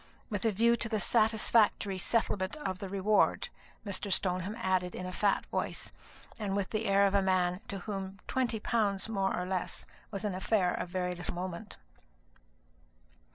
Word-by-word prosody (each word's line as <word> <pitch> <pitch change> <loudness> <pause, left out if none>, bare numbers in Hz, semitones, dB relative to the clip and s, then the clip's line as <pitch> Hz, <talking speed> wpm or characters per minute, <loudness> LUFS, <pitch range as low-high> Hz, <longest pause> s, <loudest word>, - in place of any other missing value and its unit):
"With 205 +1 -2
a 225 - +4
view 230 +4 +4
to 230 - -2
the 215 -2 0
satisfactory 215 -3 +3
settlement 190 -1 +1
of 240 -12 -4
the 195 - -5
reward," 200 +2 +2 0.4
Mr. 200 0 -1
Stoneham 185 +2 0
added 185 -4 0
in 180 - -5
a 185 - -4
fat 200 +2 +1
voice, - - -2 0.5
and 200 -2 -1
with 200 -2 -1
the 220 0 -1
air 200 0 +5
of 200 - +2
a 200 - +4
man 185 -1 +1
to 200 - -4
whom 195 -2 -4
twenty 240 -4 0
pounds 210 -3 +1
more 195 -4 0
or 180 - -2
less 185 -1 -2 0.2
was 205 +1 -4
an 205 - 0
affair 185 0 +1
of 180 - -3
very 180 0 -1
little 175 0 -5
moment. 185 +3 -5
195 Hz, 170 wpm, -31 LUFS, 185-215 Hz, 0.5 s, air